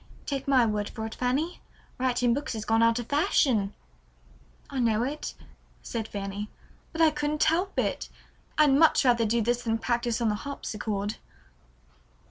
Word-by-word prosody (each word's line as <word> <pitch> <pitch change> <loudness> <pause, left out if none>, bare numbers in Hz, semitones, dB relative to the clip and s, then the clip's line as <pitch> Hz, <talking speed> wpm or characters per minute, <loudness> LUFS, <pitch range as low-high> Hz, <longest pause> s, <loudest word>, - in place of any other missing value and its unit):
Take 275 -2 -3
my 260 -3 +5
word 210 -2 -1
for 220 - -5
it, 220 - -6
Fanny, 275 +8 -1 0.4
writing 245 -2 +2
books 285 +2 -3
has 215 -1 -5
gone 225 +1 +3
out 230 0 +4
of 240 - -3
fashion." 240 -7 +2 0.9
"I 275 - -4
know 230 -2 +2
it," 285 +4 -4 0.5
said 225 -2 -4
Fanny, 200 0 -5 0.4
"but 325 - -2
I 320 -1 +6
couldn't 300 0 0
help 360 +5 +1
it. - - -1 0.5
I'd 300 -3 +5
much 300 0 +5
rather 235 -3 +4
do 230 +1 +1
this 240 +2 0
than 225 -2 0
practice 235 0 -1
on 230 -2 +1
the - - +1
harpsichord." 210 -7 -4
240 Hz, 160 wpm, -27 LUFS, 220-280 Hz, 0.9 s, I